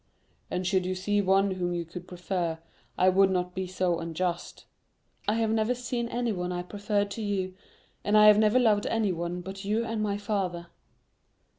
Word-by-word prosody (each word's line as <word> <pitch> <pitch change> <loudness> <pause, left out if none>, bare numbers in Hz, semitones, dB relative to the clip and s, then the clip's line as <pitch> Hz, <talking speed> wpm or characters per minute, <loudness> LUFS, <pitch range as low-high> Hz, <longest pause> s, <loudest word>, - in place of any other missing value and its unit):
"And 180 - -2
should 190 0 +2
you 185 +1 -2
see 205 +2 +1
one 195 +1 +3
whom 175 -1 -2
you 170 -1 -3
could 175 +2 -9
prefer, 180 -2 -2 0.4
I 185 - +4
would 195 +1 +4
not 180 -1 -1
be 185 0 -3
so 180 -2 0
unjust——" 170 +1 -3 0.6
"I 210 - +2
have 225 -1 +1
never 220 +2 +1
seen 240 -1 -3
anyone 215 -8 -2
I 175 0 -3
preferred 205 +1 -1
to 225 - -5
you, 195 -3 -2 0.5
and 205 +1 +3
I 210 - +8
have 210 0 +8
never 215 +2 +4
loved 220 -5 +3
anyone 180 -5 -1
but 195 +2 -8
you 215 +3 0
and 225 -1 -2
my 205 -1 0
father." 190 -5 -2
195 Hz, 180 wpm, -28 LUFS, 180-210 Hz, 0.6 s, I